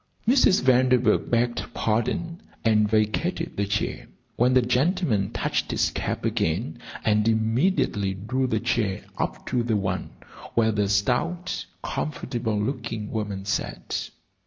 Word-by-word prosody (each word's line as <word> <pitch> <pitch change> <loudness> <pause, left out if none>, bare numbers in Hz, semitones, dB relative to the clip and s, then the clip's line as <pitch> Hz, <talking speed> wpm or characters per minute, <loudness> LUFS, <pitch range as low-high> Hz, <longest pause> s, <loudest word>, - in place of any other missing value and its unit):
Mrs. 245 - +5
Vanderburgh 130 -1 +3
begged 120 0 +1
pardon 165 - -1 0.2
and 105 -2 +4
vacated 110 - 0
the 100 0 -1
chair, 100 +1 -2 0.3
when 125 +2 +3
the 130 - +6
gentleman 130 - +1
touched - - -1
his - - +1
cap - - -3
again, 80 +1 -1 0.3
and 105 0 +3
immediately 110 - +1
drew 125 +7 -1
the 110 -3 0
chair 110 -4 0 0.2
up - - -2
to 125 -1 0
the 115 -2 +1
one 95 -3 -2 0.5
where 110 -1 +4
the 105 -2 0
stout, 130 - 0 0.2
comfortable 115 -7 -2
looking 115 -2 -3
woman 100 -3 -3
sat. - - -3
115 Hz, 130 wpm, -25 LUFS, 105-130 Hz, 0.5 s, the